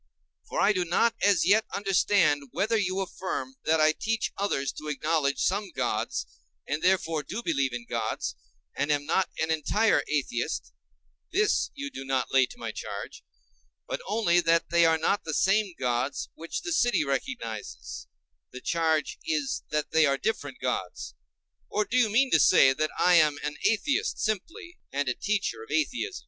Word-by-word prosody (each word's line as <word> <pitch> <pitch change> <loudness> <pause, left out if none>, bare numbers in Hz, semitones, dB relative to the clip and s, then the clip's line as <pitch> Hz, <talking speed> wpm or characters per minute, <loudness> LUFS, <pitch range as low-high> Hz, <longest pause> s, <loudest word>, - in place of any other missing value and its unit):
for - - -2
I 210 - +4
do 185 -2 0
not 180 +7 +2
as 200 -5 +4
yet 215 +3 +5
understand 195 -6 +2
whether 205 +6 0
you 195 -3 0
affirm 190 +7 -4
that 160 0 +3
I 155 0 +5
teach 225 0 -1
others 140 -9 -1
to 155 - -9
acknowledge 150 -1 0
some 200 +1 0
gods, - - -1 0.4
and 150 +2 -2
therefore 165 -4 +1
do 215 +10 -6
believe 140 -5 +1
in 120 -1 -6
gods - - -3 0.4
and 145 +1 0
am 145 -1 0
not 180 +5 +1
an 160 0 0
entire 200 +4 +2
atheist—this 120 - -2
you 280 0 -5
do 135 - -7
not 135 -1 -1
lay 130 -1 +5
to - - -13
my - - -5
charge; - - -7 0.6
but - - -4
only 210 -6 +3
that 165 -1 +2
they 170 -1 +5
are 160 0 +3
not 180 +5 0
the 160 -2 -3
same 195 -1 +2
gods 125 +1 -2
which 165 - -6
the 350 - -4
city 245 - +2
recognizes—the 105 - -6
charge 160 -3 0
is 295 -4 -1
that 150 -1 -2
they 160 -1 +4
are 140 0 +1
different 220 - -3
gods. - - -3 0.6
Or, 210 0 0
do 245 - -4
you 240 -4 +4
mean 255 +5 +3
to 160 - +5
say 135 -1 +6
that 155 +3 -1
I 180 - +4
am 150 -3 +4
an 150 0 -3
atheist 250 +6 0
simply, 320 - -4
and 140 0 -1
a 125 - +1
teacher 210 - -2
of 445 - -11
atheism? 365 +6 -1
165 Hz, 170 wpm, -27 LUFS, 145-210 Hz, 0.6 s, say